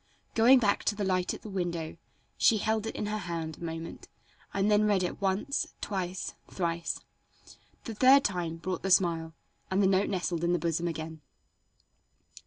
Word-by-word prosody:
Going 240 +4 +7
back 210 -5 +2
to 205 - +1
the 205 - -2
light 185 -2 0
at - - -13
the 215 - -7
window, 170 -4 -3 0.4
she 225 - +4
held 220 +1 0
it - - -5
in - - -2
her 210 +1 -2
hand 165 -4 -4
a - - -9
moment 165 0 -6 0.4
and 200 +2 +1
then 210 0 +4
read 200 -3 +2
it 180 - -4
once, 195 +9 -1
twice, 185 -2 -3 0.2
thrice. 170 -2 -2 0.8
The 225 - -5
third 260 +5 +6
time 175 -4 -1
brought 180 +1 -4
the 195 - -2
smile, 165 -3 +2 0.3
and 190 - +1
the - - +5
note 190 +1 +3
nestled 175 -3 -2
in 170 +1 +2
the - - +3
bosom 170 0 -1
again. 160 -1 -5
185 Hz, 180 wpm, -29 LUFS, 170-205 Hz, 0.8 s, Going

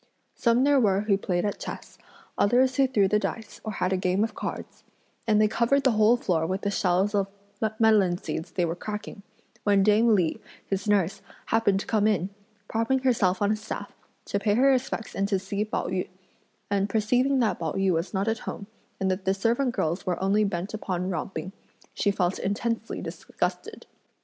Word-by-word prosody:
Some 235 +1 +2
there 285 0 +4
were 200 -4 +3
who 210 -1 +2
played 180 -2 -1
at 205 - -2
chess, - - -8 0.4
others 255 +5 +3
who 270 -1 +4
threw 210 -7 +3
the 210 +2 +2
dice 220 0 -5
or 215 - -4
had 185 0 0
a - - +1
game 185 +2 +1
of 225 -1 -2
cards; - - -6 0.4
and 210 -1 +4
they 215 - +5
covered 235 +6 +2
the 265 - +4
whole 215 +2 +4
floor 165 -8 0
with 190 +3 -2
the 200 - -1
shells 190 +1 +1
of 200 -1 +1 0.5
melon 210 -6 +4
seeds 160 - -5
they 180 - 0
were 165 - -1
cracking, 210 +2 -6 0.4
when 200 -2 +4
dame 215 +2 +4
Li, 175 -5 0 0.3
his 195 +1 -3
nurse, 200 -3 +1 0.2
happened 205 -4 +2
to - - -7
come 215 -2 +2
in, 195 -3 0 0.4
propping 230 +4 +1
herself 205 -7 +2
on 205 - +3
a - - +2
staff, 215 +1 -7 0.3
to 200 - -1
pay 205 0 +1
her 270 +4 +5
respects 255 -3 -1
and 195 0 0
to 200 -1 +1
see 200 +2 -2
Pao 215 - -3
yü, 185 0 -2 0.6
and 200 0 +1
perceiving 250 +6 +2
that 235 -4 +1
Pao 160 -2 -2
yü 195 -1 +1
was 165 +3 -1
not 195 +1 -1
at 225 0 0
home 200 - -6 0.3
and 190 -1 +1
that 185 +1 -3
the 190 0 +2
servant 235 +6 +1
girls 165 +4 -1
were 180 -3 -2
only 200 +3 +2
bent 195 0 -3
upon 185 -3 -2
romping, 175 +1 -4 0.4
she 205 - +1
felt 190 -2 0
intensely 225 +3 -2
disgusted. - - -4
205 Hz, 195 wpm, -26 LUFS, 190-225 Hz, 0.6 s, they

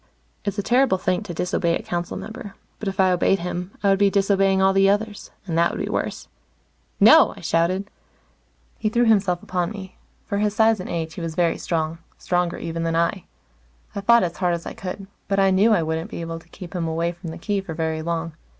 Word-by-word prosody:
It's 200 0 -3
a 205 - -1
terrible 245 -4 +3
thing 185 0 0
to 205 -4 -7
disobey 170 -1 0
a - - -10
council 175 0 -3
member. 220 -3 -8 0.2
But 215 - -5
if 195 +1 -4
I 190 -1 +5
obeyed 180 +2 +3
him, 180 0 -4
I 200 - +4
would 195 - +2
be 200 -1 +5
disobeying 195 -1 +2
all 190 0 +4
the 195 0 +4
others. 205 +1 -1 0.2
And 170 -4 -3
that 170 - +4
would - - -5
be - - -3
worse. - - -3 0.7
"No!" - - +7
I - - -10
shouted. 185 +4 0 0.9
He 215 - 0
threw 240 +2 +2
himself 195 -5 +2
upon 180 -2 -1
me. 195 -3 -9 0.3
For 200 -2 -2
his 210 0 0
size 220 -1 +4
and 185 - -6
age, 165 -2 -3
he 175 - -7
was 165 -1 -4
very 170 -1 +1
strong 165 -1 -2 0.2
stronger, 175 -1 -1
even, 165 0 -4
than 165 0 -1
I. 170 +3 0 0.7
I 200 - -4
fought 235 +3 +5
as 175 -1 -3
hard 180 -2 +1
as 170 - -8
I - - -5
could, 195 +1 -6 0.2
but 195 - 0
I 195 -1 +4
knew 200 +4 +4
I 180 -6 +3
wouldn't 160 +1 -3
be - - -6
able 165 0 -5
to 165 - -22
keep 180 0 -10
him 170 -3 -2
away 165 +1 -1
from 175 0 -9
the 160 - -7
Key 200 +2 -1
for 165 -4 -7
very 160 -1 -2
long. 165 0 -3
185 Hz, 230 wpm, -23 LUFS, 170-200 Hz, 0.9 s, No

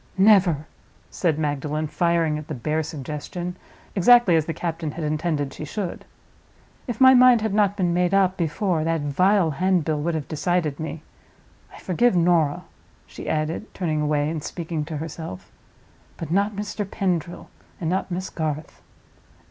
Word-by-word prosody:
"Never!" 190 -7 +4 0.5
said 165 -5 0
Magdalen, 150 0 -2
firing 165 -1 +1
at 155 - -10
the 155 - -4
bare 150 +6 -1
suggestion, 155 +4 -5 0.4
exactly 215 -1 +6
as 160 -2 +2
the - - -1
captain 165 -2 -3
had 165 - -5
intended 150 -2 -1
she - - -7
should. 180 +4 -5 0.8
"If 240 -3 -4
my 260 0 +8
mind 250 -2 +6
had 220 -2 -1
not 205 -1 +2
been 175 -3 +1
made 180 0 +1
up 190 -1 +3
before, 170 0 -1
that 165 -1 0
vile 180 +5 +2
handbill 160 -2 +1
would 170 +2 -1
have 155 -3 -4
decided 155 -2 -1
me. 160 0 -5 0.7
I - - -13
forgive 195 +4 +1
Norah," 165 -4 +2 0.4
she - - -8
added, 155 +7 -2
turning 155 -4 -1
away 150 -1 +1
and 155 -1 -3
speaking 165 -3 -4
to 155 0 -5
herself, 160 - -7 0.7
"but 165 -1 -6
not 200 +3 +1
Mr. 205 0 -4
Pendril, 175 -4 -2 0.3
and 165 - -3
not 185 +3 -1
Miss 185 +1 -4
Garth." 155 -2 -4
165 Hz, 155 wpm, -23 LUFS, 155-185 Hz, 0.8 s, my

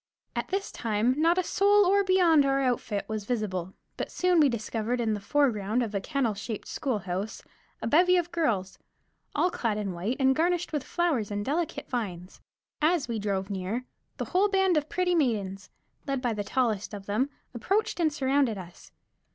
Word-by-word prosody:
At - - -2
this 390 +1 -2
time 225 +2 +1
not 335 +2 +4
a 370 - +2
soul 400 +1 +4
beyond 360 -6 +5
our 275 0 +2
outfit 240 -6 -1
was 215 -2 -4
visible, 195 -6 -2 0.2
but - - -3
soon 360 -1 +2
we 295 -3 +6
discovered 230 +1 -2
in 225 -2 +1
the 210 - -2
foreground 225 -1 +1
of 220 -2 -4
a 200 - -1
kennel 270 -3 0
shaped 205 +1 -6
schoolhouse 205 -5 -3 0.4
a - - -1
bevy 360 +8 +5
of 345 -1 -1
girls, 225 - -1 0.6
all 360 - +2
clad 225 -8 -1
in 205 -2 -2
white 195 +9 -2
and 265 0 +4
garnished 345 +2 0
with 295 -3 -1
flowers 310 - 0
and 205 0 -3
delicate 315 +4 -2
vines. 190 -8 -5 0.4
As 315 -2 +2
we 230 -2 -2
drove 200 -1 -2
near, 200 +6 -3 0.3
the - - -3
whole 390 +3 +2
band 385 -2 +3
of 300 0 0
pretty 365 -1 +1
maidens, 205 - 0 0.4
led 275 -1 0
by 245 -2 -1
the 210 -1 -3
tallest 215 -3 -1
of 200 -1 -9
them, 220 +8 0 0.2
approached 390 - 0
and 320 -2 +3
surrounded 270 -5 +1
us. 175 -2 -11
250 Hz, 180 wpm, -28 LUFS, 205-330 Hz, 0.6 s, we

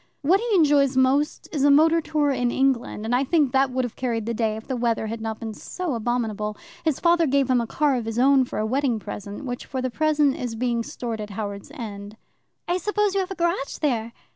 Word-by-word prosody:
What 360 +7 +4
he 460 -1 0
enjoys 285 -5 +4
most 270 +3 +2
is 290 -4 -1
a 285 - +6
motor 320 +3 +5
tour 300 -2 +1
in 245 -2 0
England, 255 -4 0
and 230 - -1
I 250 +2 +3
think 290 -2 +2
that 270 +1 +3
would 255 0 -1
have 240 - -7
carried 230 -4 -2
the 235 - -2
day 220 -1 0
if 220 - -9
the 260 - -3
weather 235 -2 0
had 220 +1 -5
not 220 -1 -4
been 225 -1 -5
so 355 - -4
abominable. 220 -3 -2 0.3
His 315 -5 0
father 340 -1 +3
gave 270 -1 +2
him 250 -1 +3
a 230 - -4
car 290 +3 +1
of 235 - -4
his 225 0 -4
own 265 +1 +5
for - - -6
a 215 - 0
wedding 255 0 +1
present, 205 +3 -7
which 245 -1 -5
for 260 - -4
the 255 0 -2
present 300 -1 +2
is 245 -2 -4
being 235 0 0
stored 230 -1 -5
at 210 - -6
Howards 200 +2 -6
End." 210 -4 -7 0.5
"I 350 - +1
suppose 420 +2 0
you 395 - +1
have 375 - -2
a 385 - -5
garage 340 -5 -1
there?" 235 -6 -1
255 Hz, 240 wpm, -24 LUFS, 225-295 Hz, 0.5 s, a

